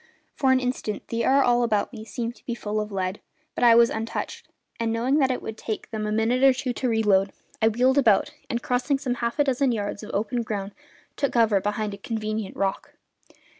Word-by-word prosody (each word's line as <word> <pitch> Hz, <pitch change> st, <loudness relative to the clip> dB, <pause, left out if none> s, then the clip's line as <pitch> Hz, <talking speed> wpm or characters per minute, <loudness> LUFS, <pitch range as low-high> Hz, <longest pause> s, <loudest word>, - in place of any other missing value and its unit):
For 265 Hz, -2 st, +2 dB
an 260 Hz, -, +4 dB
instant 250 Hz, -4 st, -3 dB
the 230 Hz, 0 st, -1 dB
air 275 Hz, +1 st, +4 dB
all 245 Hz, 0 st, +3 dB
about 220 Hz, 0 st, 0 dB
me 220 Hz, -2 st, -8 dB
seemed 235 Hz, +1 st, -4 dB
to -, -, -23 dB
be 235 Hz, -, -2 dB
full 215 Hz, -2 st, -2 dB
of 210 Hz, 0 st, -6 dB
lead, 190 Hz, 0 st, -3 dB, 0.3 s
but -, -, -2 dB
I 235 Hz, -1 st, +7 dB
was 235 Hz, 0 st, +6 dB
untouched; 225 Hz, +1 st, -4 dB, 0.3 s
and, 230 Hz, -1 st, 0 dB
knowing 250 Hz, +6 st, +1 dB
that 265 Hz, -2 st, +3 dB
it 255 Hz, -, -2 dB
would 220 Hz, 0 st, -6 dB
take 220 Hz, -, -5 dB
them 215 Hz, -1 st, -3 dB
a -, -, -2 dB
minute 225 Hz, +4 st, +1 dB
or 270 Hz, -1 st, +7 dB
two 255 Hz, -1 st, -2 dB
to 255 Hz, +1 st, -1 dB
reload, 200 Hz, -4 st, +3 dB, 0.3 s
I 220 Hz, -, +5 dB
wheeled 250 Hz, +5 st, +3 dB
about 225 Hz, +2 st, +3 dB, 0.2 s
and, 235 Hz, +1 st, -2 dB
crossing 250 Hz, +3 st, +1 dB
some 260 Hz, -2 st, -2 dB
half 235 Hz, 0 st, -1 dB
dozen 275 Hz, -2 st, +2 dB
yards 205 Hz, -3 st, -3 dB
of 210 Hz, -, -9 dB
open 220 Hz, +4 st, -1 dB
ground, 205 Hz, -3 st, -4 dB, 0.4 s
took 280 Hz, -2 st, -1 dB
cover 225 Hz, -4 st, +3 dB
behind 210 Hz, +1 st, -2 dB
a -, -, -7 dB
convenient 215 Hz, -1 st, -4 dB
rock. 195 Hz, -1 st, -2 dB
230 Hz, 215 wpm, -25 LUFS, 215-250 Hz, 0.4 s, I